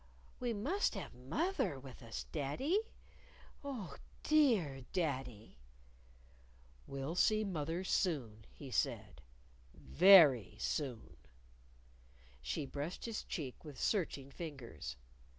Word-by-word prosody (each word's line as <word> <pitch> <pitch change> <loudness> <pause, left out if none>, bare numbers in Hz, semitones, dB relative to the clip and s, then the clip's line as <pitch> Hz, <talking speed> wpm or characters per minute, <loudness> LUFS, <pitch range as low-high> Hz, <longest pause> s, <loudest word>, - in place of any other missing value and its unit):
"We 245 -1 -1
must 265 - 0
have 195 - -6
moth 305 - -2
er 135 - 0
with 130 0 -11
us, 115 -2 -5
daddy. 250 - 0 0.8
Oh, 250 - -5 0.3
dear 220 - +3
daddy!" 130 - -3 1.3
"We'll 135 +3 -4
see 215 +4 +3
mother 170 -2 -2
soon," 130 - -1
he 140 -3 -10
said; 105 -8 -1 0.3
" - - -28
very 140 - +7
soon." 125 - -3 1.2
She 60 - -2
brushed 145 +6 -5
his 230 -2 -3
cheek 140 -8 -5
with 145 -5 -9
searching 145 -9 -1
fingers. 135 - -7
145 Hz, 105 wpm, -36 LUFS, 125-195 Hz, 1.3 s, very